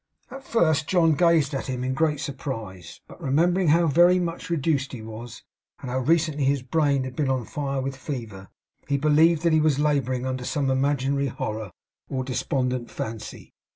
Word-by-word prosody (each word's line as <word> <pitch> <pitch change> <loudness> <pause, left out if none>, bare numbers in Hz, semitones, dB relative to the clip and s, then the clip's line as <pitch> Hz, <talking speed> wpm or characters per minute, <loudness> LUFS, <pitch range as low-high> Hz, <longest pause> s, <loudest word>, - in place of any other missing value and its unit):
At 270 +1 -9
first, 160 - +1
John 170 -3 +3
gazed 160 -2 +3
at 135 - -3
him 125 -1 -3
in 130 +1 -1
great 150 0 +1
surprise; 110 - -6
but - - -14
remembering 170 +5 +2
how 165 +3 +4
very 175 +4 +5
much 175 -1 -3
reduced 145 -4 0
he 115 -4 -7
was, 110 +2 -9 0.4
and 125 - -6
how 130 - 0
recently 155 +1 +1
his 135 -1 +1
brain 140 0 +1
had 130 -1 -7
been 145 -3 0
on 130 -3 0
fire 140 0 -3
with 135 +1 -4
fever, 115 -8 -7 0.4
believed 155 +3 +3
that 170 -2 +3
he 155 - +4
was 150 -3 +2
labouring 135 -4 0
under 130 -1 -3
some 135 +1 -1
imaginary 140 +1 +1
horror 110 -5 -4 0.4
or 130 -1 -2
despondent 125 -1 -2
fancy. 110 0 -7
140 Hz, 175 wpm, -25 LUFS, 130-155 Hz, 0.4 s, very